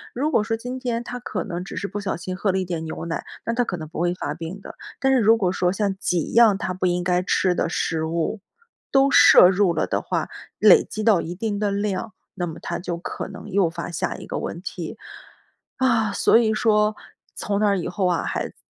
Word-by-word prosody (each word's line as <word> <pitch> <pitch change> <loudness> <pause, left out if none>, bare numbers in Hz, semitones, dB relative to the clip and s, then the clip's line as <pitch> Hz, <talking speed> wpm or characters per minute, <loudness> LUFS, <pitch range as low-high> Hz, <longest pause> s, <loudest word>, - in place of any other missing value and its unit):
如 290 +6 0
果 215 - +3
说 225 +1 -2
今 250 +3 -6
天 240 -2 -2
他 245 0 -6
可 245 - -4
能 180 -3 -5
只 195 - -8
是 200 - -2
不 205 +1 -5
小 195 -3 -2
心 185 +2 -5
喝 195 +1 0
了 190 - -1
一 190 - -1
点 170 -2 -4
牛 160 +1 -6
奶， 165 - -3 0.2
但 230 - -2
他 245 - +2
可 195 -6 -4
能 155 -2 -7
不 160 - -7
会 175 0 +1
发 150 - -4
病 165 +4 -7
的。 - - -10 0.3
但 270 0 +2
是 260 - +4
如 225 0 +5
果 185 -4 +1
说 180 -1 +1
像 195 0 -1
几 175 -6 -1
样 225 -4 +6
他 190 -3 -3
不 185 0 -1
应 175 0 0
该 180 0 +1
吃 185 0 +1
的 170 - -1
食 160 -1 -1
物 165 +6 -2 0.5
都 275 0 +4
摄 180 - +8
入 190 -1 +2
了 155 - 0
的 - - -1
话， - - -2 0.3
累 460 - +7
积 215 - -6
到 210 -5 +4
一 175 +2 -6
定 205 +1 -3
的 210 -1 0
量， 200 +1 -2 0.2
那 175 -2 -3
么 160 - -7
他 170 - -4
就 175 -1 -4
可 170 - -6
能 195 +2 -10
诱 190 -3 +2
发 170 - -6
下 165 - -2
一 - - -9
个 - - -4
问 170 - -5
题。 180 -3 -6 0.8
啊， 230 -5 +2
所 - - +3
以 220 -2 +2
说 215 -1 +2 0.4
从 200 -1 -2
那 205 -1 +3
以 180 - -3
后 185 0 -1
啊， 175 -2 0
孩 - - -3
子 - - -21
195 Hz, 260 characters per minute, -23 LUFS, 175-220 Hz, 0.8 s, 摄